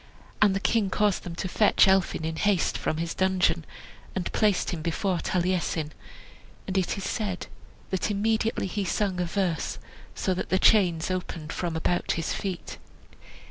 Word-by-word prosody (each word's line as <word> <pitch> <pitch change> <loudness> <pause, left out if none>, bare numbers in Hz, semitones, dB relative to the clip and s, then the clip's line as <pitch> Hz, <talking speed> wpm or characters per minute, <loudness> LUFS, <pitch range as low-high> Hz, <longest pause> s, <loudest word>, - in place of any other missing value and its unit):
And 200 -2 +5
the - - +1
king 210 -1 +1
caused 205 0 +1
them 170 -2 -7
to 185 - -3
fetch 205 +2 +4
Elphin 190 -4 +2
in 160 0 -3
haste 200 -1 +2
from 155 - -1
his 165 +1 -2
dungeon, 185 -3 +2 0.5
and 185 -2 -2
placed 210 -4 +2
him 170 - -4
before 175 +3 0
Taliesin. 175 -4 0 0.7
And 190 - -4
it 190 0 +1
is 195 - -5
said 200 -4 -2 0.5
that 190 +2 0
immediately 220 +2 +1
he 200 +2 -2
sung 190 0 0
a - - +1
verse, 175 -1 -1 0.4
so 190 - 0
that 180 - -4
the 185 - +3
chains 185 -5 +4
opened 165 -4 -4
from 170 -2 -2
about 175 +2 0
his 165 -2 -2
feet. 190 -3 -5
185 Hz, 165 wpm, -27 LUFS, 170-200 Hz, 0.7 s, And